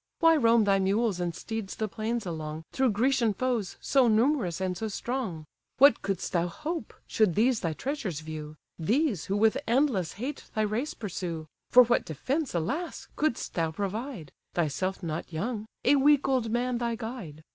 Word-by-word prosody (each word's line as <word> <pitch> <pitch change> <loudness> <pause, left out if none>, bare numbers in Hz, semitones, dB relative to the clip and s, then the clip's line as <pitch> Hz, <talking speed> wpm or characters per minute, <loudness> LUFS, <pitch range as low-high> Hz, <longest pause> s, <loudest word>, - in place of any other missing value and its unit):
Why 330 -1 +5
roam 230 -5 +5
thy 195 -1 +3
mules 200 +1 +1
and 175 -1 -2
steeds 220 -3 -5
the 220 - -2
plains 220 +2 -3
along, 155 -2 -5
Through 265 -1 +2
Grecian 230 0 +2
foes, 240 -5 -1
so 265 -3 +3
numerous 225 - +2
and 185 -1 -1
so 220 +5 -3
strong? 215 -7 -3 0.3
What 275 -2 +6
couldst 195 -3 -3
thou 175 -1 +2
hope, 305 - -5
should 215 -6 +2
these 235 +3 +3
thy 165 -3 -1
treasures 215 - -3
view; 155 -1 -7 0.2
These, 225 - +1
who 195 - -1
with 220 +1 +3
endless 235 - +2
hate 260 +8 -5
thy 215 - +2
race 220 +8 -2
pursue? 175 -6 -4 0.2
For 250 - +9
what 240 0 +1
defence, 260 - -2
alas! 280 - -3
could'st 305 -6 -1
thou 165 -2 0
provide; 200 - -4 0.2
Thyself 175 +4 -1
not 165 +1 -4
young, 210 +6 -3 0.2
a 280 +3 +6
weak 285 0 +4
old 255 -4 +1
man 240 +1 0
thy 235 -1 -1
guide? 220 - -7
220 Hz, 170 wpm, -28 LUFS, 175-255 Hz, 0.3 s, For